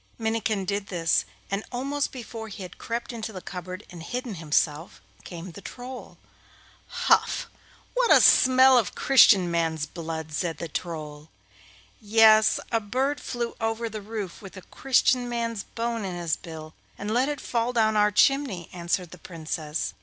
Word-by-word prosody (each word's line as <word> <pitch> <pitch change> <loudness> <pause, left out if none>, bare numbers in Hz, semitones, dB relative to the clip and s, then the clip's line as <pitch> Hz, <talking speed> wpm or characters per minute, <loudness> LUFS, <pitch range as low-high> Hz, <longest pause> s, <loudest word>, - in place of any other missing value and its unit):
Minnikin 220 -3 -1
did 200 +1 -2
this, 165 -3 +1 0.3
and 200 +2 -1
almost 275 +3 -2
before 230 -3 -7
he 200 -2 -8
had 180 - -11
crept 235 +1 -4
into 225 -1 -5
the 190 - -7
cupboard 185 +2 -7
and 175 -2 -9
hidden 245 +6 -4
himself, 155 -1 -1 0.2
came 175 0 -8
the 200 - -11
Troll. 250 +3 -9 0.9
'Huf! - - +3 0.5
What - - +2
a - - +9
smell 260 0 +6
of 220 - -3
Christian 200 -9 +6
man's 165 -2 0
blood!' 160 -1 -6
said 165 +2 -2
the 170 - -5
Troll. 155 -2 -6 0.7
'Yes, 220 0 +5
a 230 - +2
bird 260 +7 -1
flew 240 -1 -4
over 225 +1 -1
the 215 -1 -6
roof 205 -4 -6
with 195 -1 -11
a 185 - -10
Christian 255 -2 +1
man's 230 -3 -3
bone 230 -1 -3
in 185 -2 -4
his 170 -2 -1
bill, 160 -2 -10 0.2
and 205 +1 -4
let 255 +4 +2
it 290 -2 -3
fall 235 -1 -1
down 220 -3 +2
our 210 0 +4
chimney,' 210 - +2
answered 175 0 -2
the 180 - -11
Princess. 160 -2 -4
210 Hz, 160 wpm, -26 LUFS, 170-235 Hz, 0.9 s, a